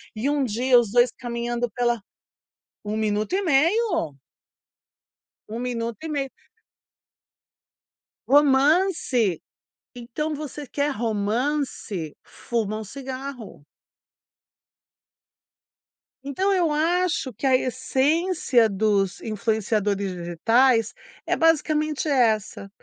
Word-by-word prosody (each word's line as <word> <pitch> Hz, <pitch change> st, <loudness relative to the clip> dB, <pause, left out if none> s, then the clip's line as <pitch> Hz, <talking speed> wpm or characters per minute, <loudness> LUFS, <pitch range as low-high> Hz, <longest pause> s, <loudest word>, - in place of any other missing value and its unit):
e 230 Hz, +6 st, -1 dB
um 290 Hz, -1 st, +1 dB
dia 245 Hz, +2 st, +3 dB
os 230 Hz, -4 st, -2 dB
2 240 Hz, +1 st, +4 dB
caminhando 240 Hz, 0 st, -3 dB
pela 240 Hz, +1 st, 0 dB, 0.9 s
1 210 Hz, +1 st, -3 dB
minuto 215 Hz, +3 st, -1 dB
e 385 Hz, -, +2 dB
meio. 335 Hz, -, +2 dB, 1.4 s
1 225 Hz, +2 st, -5 dB
minuto 235 Hz, -2 st, -3 dB
e -, -, -4 dB
meio. 280 Hz, -3 st, -2 dB, 2.0 s
Romance. 280 Hz, -, +3 dB, 0.6 s
Então 275 Hz, +6 st, -4 dB
você 295 Hz, 0 st, -7 dB
quer 285 Hz, +2 st, -1 dB
romance, 225 Hz, -, -2 dB
fuma 215 Hz, -3 st, -3 dB
um -, -, -6 dB
cigarro. 260 Hz, -, -8 dB, 2.6 s
Então 280 Hz, +9 st, 0 dB
eu 355 Hz, -4 st, +2 dB
acho 330 Hz, -2 st, 0 dB
que 215 Hz, -, -6 dB
a 260 Hz, -, +5 dB
essência 260 Hz, +1 st, +1 dB
dos 200 Hz, -2 st, 0 dB
influenciadores 210 Hz, -2 st, -1 dB
digitais 225 Hz, +7 st, +2 dB, 0.3 s
é -, -, +1 dB
basicamente 310 Hz, -1 st, +1 dB
essa: 220 Hz, -6 st, +1 dB
245 Hz, 90 wpm, -24 LUFS, 220-290 Hz, 2.6 s, a